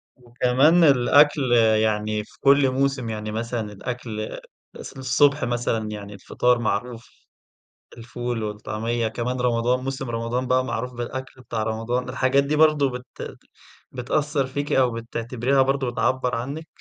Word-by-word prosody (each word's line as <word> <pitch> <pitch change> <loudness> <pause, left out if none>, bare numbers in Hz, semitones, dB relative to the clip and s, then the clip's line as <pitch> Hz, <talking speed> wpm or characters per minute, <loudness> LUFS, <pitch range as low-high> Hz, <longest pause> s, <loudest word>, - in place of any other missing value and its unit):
وكمان 125 +7 +3
الأكْل 140 -1 +4 0.3
يعني 105 0 0
في - - -21
كُلّ 140 -1 +5
موسم، 135 -3 0
يعني 110 -1 -4
مثلًا 115 -1 -3
الأكْل 110 0 -5 0.4
الص - - -9
الصبح 140 +2 +2
مثلًا 120 -3 -1
يعني 105 -1 -7
الفطار 125 +4 0
معروف، 115 +2 -3 0.9
الفول 120 0 -4
والطعمية، 110 +2 -2
كمان 125 +3 -3
رمضان 125 +1 +1
موسم 135 -1 -4
رمضان 115 +2 -2
بقى 130 0 +2
معروف 125 +1 -4
بالأكْل 130 +2 -6
بتاع 115 -3 -3
رمضان، 115 +3 -2
الحاجات 130 +2 +2
دي 145 +2 -1
برضو 150 -2 +4
بت 125 0 -8 0.5
بتأثّر 140 +2 -1
فيكِ 145 +2 -4
أو 130 -2 +3
بتعتبريها 115 +3 -1
برضو 135 -1 +1
بتعبّر 125 0 0
عنِّك؟ 140 +7 -5
125 Hz, 130 wpm, -23 LUFS, 115-135 Hz, 0.9 s, كُلّ